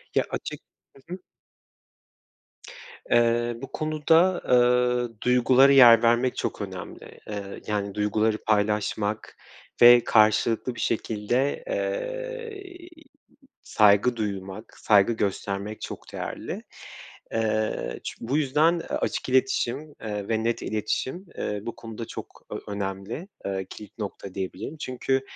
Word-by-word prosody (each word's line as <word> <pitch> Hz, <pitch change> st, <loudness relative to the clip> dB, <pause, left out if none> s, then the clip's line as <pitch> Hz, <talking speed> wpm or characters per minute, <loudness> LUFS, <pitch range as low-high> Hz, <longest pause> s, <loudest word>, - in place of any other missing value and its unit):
Ya, -, -, +4 dB
açık -, -, -5 dB, 0.3 s
Hı 160 Hz, +6 st, -11 dB
hı. 185 Hz, -, -6 dB, 1.9 s
Eee, 120 Hz, 0 st, +3 dB
bu 135 Hz, -, -8 dB
konuda, 160 Hz, +4 st, +2 dB
eee, 125 Hz, -1 st, +3 dB
duygulara 125 Hz, +2 st, +5 dB
yer 120 Hz, -4 st, +8 dB
vermek 120 Hz, +2 st, +3 dB
çok -, -, -3 dB
önemli. -, -, -8 dB
Eee, 105 Hz, -1 st, -4 dB, 0.2 s
yani, 100 Hz, -2 st, -2 dB
duyguları 105 Hz, +1 st, +1 dB
paylaşmak 105 Hz, 0 st, 0 dB, 0.4 s
ve 120 Hz, 0 st, +9 dB
karşılıklı 110 Hz, +3 st, +3 dB
bir -, -, -9 dB
şekilde, 115 Hz, -, -1 dB
eee, -, -, -4 dB, 1.0 s
saygı 105 Hz, +3 st, +4 dB
duymak, 100 Hz, -1 st, -5 dB
saygı 105 Hz, +1 st, +4 dB
göstermek 100 Hz, 0 st, -3 dB
çok -, -, -8 dB
değerli. -, -, -5 dB, 0.7 s
Eee, 110 Hz, -1 st, -1 dB
çü -, -, -5 dB
bu 130 Hz, +6 st, -1 dB
yüzden 155 Hz, +4 st, +2 dB
açık -, -, -2 dB
iletişim, 130 Hz, +2 st, 0 dB
eee, 105 Hz, -2 st, -4 dB
ve 110 Hz, -1 st, 0 dB
net 115 Hz, 0 st, -1 dB
iletişim, 120 Hz, -, -3 dB
eee, 105 Hz, 0 st, -2 dB
bu 115 Hz, -, -6 dB
konuda 115 Hz, 0 st, -8 dB
çok -, -, -9 dB
ö -, -, -4 dB
önemli. 100 Hz, -, -5 dB, 0.2 s
Eee, 95 Hz, -1 st, -2 dB
kilit 105 Hz, +1 st, -11 dB
nokta 100 Hz, -2 st, -6 dB
diyebilirim. 95 Hz, -, -5 dB
Çünkü 130 Hz, -1 st, -1 dB
115 Hz, 115 wpm, -25 LUFS, 105-135 Hz, 1.9 s, ve